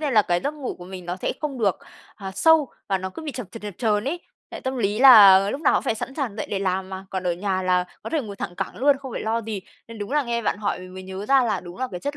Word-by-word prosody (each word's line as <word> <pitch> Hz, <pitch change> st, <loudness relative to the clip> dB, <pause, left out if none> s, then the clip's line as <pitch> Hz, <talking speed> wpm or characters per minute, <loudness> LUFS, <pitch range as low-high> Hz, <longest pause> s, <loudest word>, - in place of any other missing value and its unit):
nên 290 Hz, -5 st, -1 dB
là 215 Hz, -, +6 dB
cái 175 Hz, -2 st, 0 dB
giấc 285 Hz, +2 st, -2 dB
ngủ 285 Hz, -4 st, -5 dB
của 175 Hz, -, -12 dB
mình 185 Hz, -1 st, -9 dB
nó 175 Hz, -, -3 dB
sẽ -, -, -2 dB
không 290 Hz, -4 st, -3 dB
được, 200 Hz, -6 st, +1 dB, 0.4 s
à, 195 Hz, -2 st, -7 dB
sâu 320 Hz, +3 st, +4 dB, 0.2 s
và 195 Hz, -1 st, +1 dB
nó 190 Hz, 0 st, -5 dB
cứ 320 Hz, -, -9 dB
bị 305 Hz, -2 st, -5 dB
chập 250 Hz, -4 st, -6 dB
chờn 230 Hz, -, -10 dB
chập 210 Hz, -, -4 dB
chờn 215 Hz, -3 st, +1 dB
ấy. 325 Hz, +6 st, -2 dB, 0.3 s
Tại -, -, -7 dB
tâm 260 Hz, 0 st, -3 dB
lý 205 Hz, -3 st, 0 dB
là 205 Hz, -7 st, +9 dB
lúc 275 Hz, -, -4 dB
nào 310 Hz, -, +3 dB
cũng -, -, +2 dB
phải -, -, 0 dB
sẵn 260 Hz, +4 st, -6 dB
sàng 260 Hz, -9 st, -3 dB
dậy 215 Hz, -, -3 dB
để 200 Hz, -, -1 dB
làm 190 Hz, -1 st, -1 dB
mà, 190 Hz, 0 st, -7 dB
còn 190 Hz, -1 st, -3 dB
ở 180 Hz, -1 st, 0 dB
nhà 185 Hz, +1 st, -2 dB
là 180 Hz, -1 st, +2 dB, 0.2 s
có -, -, -6 dB
thể 320 Hz, -, +1 dB
ngồi 205 Hz, -4 st, -8 dB
thẳng 175 Hz, -, -5 dB
cẳng -, -, -4 dB
luôn, 280 Hz, +2 st, +4 dB
không 265 Hz, -3 st, -8 dB
phải -, -, -4 dB
lo 225 Hz, +1 st, 0 dB
gì. 215 Hz, -2 st, -4 dB, 0.3 s
Nên 230 Hz, -1 st, -9 dB
đúng 205 Hz, 0 st, -5 dB
là 295 Hz, -, +3 dB
nghe 235 Hz, -2 st, -2 dB
bạn 205 Hz, -, -1 dB
hỏi 205 Hz, -3 st, -1 dB
mình 185 Hz, 0 st, -11 dB
mới 185 Hz, -, -7 dB
nhớ 190 Hz, +2 st, -7 dB
ra 270 Hz, +1 st, +5 dB
là 225 Hz, -, 0 dB
đúng 175 Hz, 0 st, -11 dB
là 260 Hz, -, -2 dB
cái 180 Hz, -2 st, -6 dB
chất 285 Hz, +6 st, -4 dB
210 Hz, 320 wpm, -23 LUFS, 190-260 Hz, 0.4 s, là